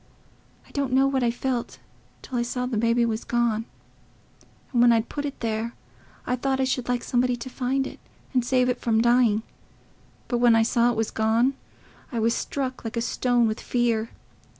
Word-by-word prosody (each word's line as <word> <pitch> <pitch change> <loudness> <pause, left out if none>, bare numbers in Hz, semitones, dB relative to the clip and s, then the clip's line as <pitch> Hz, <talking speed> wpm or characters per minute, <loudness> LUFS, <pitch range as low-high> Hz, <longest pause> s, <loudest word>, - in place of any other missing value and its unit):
I - - -19
don't 275 -3 -2
know 265 +1 +5
what 275 -1 +1
I 240 - +2
felt 240 0 -3 0.5
till 260 - -7
I 240 - +1
saw 250 +1 -2
the 250 -2 -3
baby 230 +2 +2
was 220 -1 -2
gone. 235 -2 0 1.1
And 240 - +3
when 240 0 +7
I'd 230 -1 +1
put 290 0 -4
it 280 - -6
there, 225 0 -2 0.5
I 250 - 0
thought 265 +1 -1
I - - +3
should 255 -1 -1
like 245 -1 0
somebody 250 0 +1
to 245 +2 -8
find 270 +1 -1
it - - -8 0.3
and 250 -2 +2
save 250 +1 +2
it 250 -1 -1
from 225 -2 +2
dying; 235 -2 +3 0.8
but 240 - 0
when 240 -1 +5
I 225 - +4
saw 235 +1 +3
it 240 - -1
was 225 -1 -1
gone, 225 +4 +2 0.6
I 240 - -4
was 230 +1 +2
struck 260 -2 -3
like 225 0 -5
a - - +2
stone, 245 0 +1
with 215 +1 -2
fear. 230 -2 0
240 Hz, 195 wpm, -25 LUFS, 230-255 Hz, 1.1 s, when